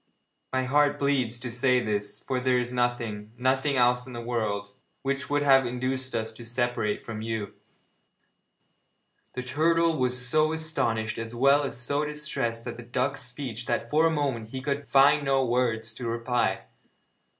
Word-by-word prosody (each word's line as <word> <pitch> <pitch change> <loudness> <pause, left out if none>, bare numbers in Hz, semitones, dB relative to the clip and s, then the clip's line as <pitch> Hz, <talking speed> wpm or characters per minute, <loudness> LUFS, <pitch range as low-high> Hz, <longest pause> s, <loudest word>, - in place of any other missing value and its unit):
My 130 0 0
heart 145 +2 +3
bleeds 130 -5 0
to 120 -1 -5
say 125 +1 +2
this, 105 -3 -2
for 130 -2 -1
there 125 0 +2
is 125 0 -2
nothing 115 -4 -2
nothing 130 +3 +1
else 125 0 +3
in 130 - -9
the 120 - -5
world 110 -4 -2 0.3
which 140 0 -2
would 145 0 +1
have 135 -2 +6
induced 130 +1 -2
us 110 -1 -2
to 115 +2 -12
separate 120 -2 -1
from 110 -2 -5
you.' 110 -2 -4 1.8
The 125 - -4
turtle 165 +5 +2
was 125 0 +2
so 155 +4 +3
astonished 115 -9 -1
as 115 +1 -6
well 140 +4 +5
as 140 - -3
so 140 +4 +1
distressed 140 -6 -3
at 120 -1 -5
the - - -8
duck's 130 +3 -1
speech 125 -2 -5
that 115 - -2
for 155 +2 +4
a - - +3
moment 135 -8 -2
he 130 - -5
could 140 +1 -3
find 140 +2 +5
no 135 -1 +2
words 115 -2 0
to 120 +1 -6
reply. 115 +1 0
125 Hz, 170 wpm, -27 LUFS, 115-140 Hz, 1.8 s, have